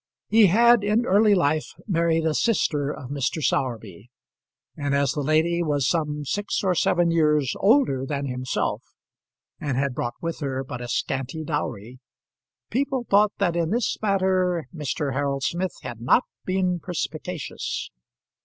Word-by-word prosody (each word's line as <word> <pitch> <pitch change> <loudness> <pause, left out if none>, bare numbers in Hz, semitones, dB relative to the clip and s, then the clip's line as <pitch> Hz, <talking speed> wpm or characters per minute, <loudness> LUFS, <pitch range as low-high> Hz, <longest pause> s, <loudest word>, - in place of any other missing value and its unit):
He 220 -2 +6
had 235 +4 +5
in 215 +3 +2
early 205 0 +4
life 155 -3 0
married 165 -4 +1
a 160 - +2
sister 150 -9 +1
of 130 -2 -8
Mr. 140 +2 -1
Sowerby; 115 - -2 0.7
and 145 -1 -1
as 140 -2 +2
the 145 - -2
lady 160 +4 +2
was 145 -5 +1
some 150 -3 -1
six 205 +10 -2
or 190 -2 +2
seven 175 0 +2
years 150 -4 +2
older 200 - +3
than 140 -1 -2
himself, 125 -1 -2 0.8
and 140 -4 -2
had 140 -1 0
brought 120 -1 -3
with 165 0 -4
her 135 -3 -2
but 125 -2 -7
a 120 - -5
scanty 135 +5 -2
dowry, 125 -6 -4 0.7
people 265 0 -1
thought 205 +1 +5
that 180 -4 +1
in 170 -2 0
this 235 +3 0
matter 185 -4 +1
Mr. 150 -2 -3
Harold 140 0 -1
Smith 175 +4 -1
had 115 -1 -7
not 130 - +4 0.2
been 185 -1 0
perspicacious. 165 -1 -4
160 Hz, 150 wpm, -24 LUFS, 140-185 Hz, 0.8 s, He